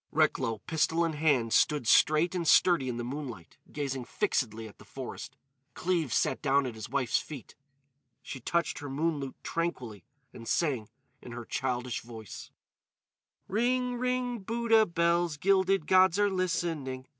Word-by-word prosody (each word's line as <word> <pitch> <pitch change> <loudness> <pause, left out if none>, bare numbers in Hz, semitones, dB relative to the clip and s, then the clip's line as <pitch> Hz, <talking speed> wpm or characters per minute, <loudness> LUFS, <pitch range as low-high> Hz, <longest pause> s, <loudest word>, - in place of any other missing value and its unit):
Recklow, 115 -1 +1
pistol 165 +1 +1
in 165 - -2
hand, 145 -7 +1
stood 150 -5 +3
straight 155 +9 +4
and 175 -3 -2
sturdy 160 -8 +4
in 120 - -3
the 120 - -3
moonlight, 125 - -7
gazing 135 -3 -3
fixedly 115 -2 -1
at 105 - -16
the - - -13
forest. - - -8 0.4
Cleves 175 -7 0
sat - - +1
down 140 -1 +2
at 125 - -4
his 110 -1 -8
wife's 130 -4 +1
feet. 140 -8 -9 0.7
She 130 - -7
touched 170 +7 -1
her 145 - -7
moon 155 +3 -1
lute 135 -2 -6
tranquilly 125 - -3 0.3
and 115 -1 -10
sang 130 -10 0 0.3
in 120 - -10
her 120 -1 -7
childish 125 -2 -2
voice: 110 -4 -10 1.0
"Ring, 250 +4 0
ring, 250 -1 -1
Buddha 225 +1 +2
bells, 170 -1 +1
_Gilded 190 0 +2
gods 185 0 +5
are 205 -1 +2
listening. 165 -8 -2
150 Hz, 150 wpm, -29 LUFS, 125-180 Hz, 1.0 s, gods